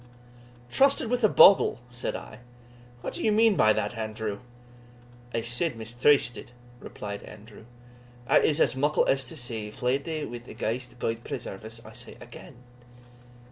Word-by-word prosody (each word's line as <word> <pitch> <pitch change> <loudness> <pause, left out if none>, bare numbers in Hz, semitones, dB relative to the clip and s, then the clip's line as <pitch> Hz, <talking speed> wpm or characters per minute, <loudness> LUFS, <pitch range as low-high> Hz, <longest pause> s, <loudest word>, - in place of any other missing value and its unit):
"Trysted 270 -4 +3
with 250 -1 0
a 215 - +6
bogle!" 195 - +6
said 120 0 -3
I; 110 - -9 0.6
"what - - -5
do - - -5
you 215 - +3
mean 220 0 +4
by 110 -8 +5
that, 105 +1 -1
Andrew?" 110 -2 -4 0.9
"I 115 - -1
said 120 +6 -2
mistrysted," 120 +2 +1 0.3
replied 100 -3 -7
Andrew; 105 +1 -13 0.6
"that - - +4
is 155 0 +2
as - - +3
muckle 145 +3 +2
as 135 -1 +1
to 155 - -8
say, 115 -5 -4
fley'd 125 +6 -1
wi' 150 -7 -4
a - - -10
ghaist 125 +3 -4
Gude 115 -1 -3
preserve 95 +3 -6
us, 115 +1 -8
I - - -12
say - - -10
again!" - - -12
120 Hz, 155 wpm, -27 LUFS, 110-150 Hz, 0.9 s, a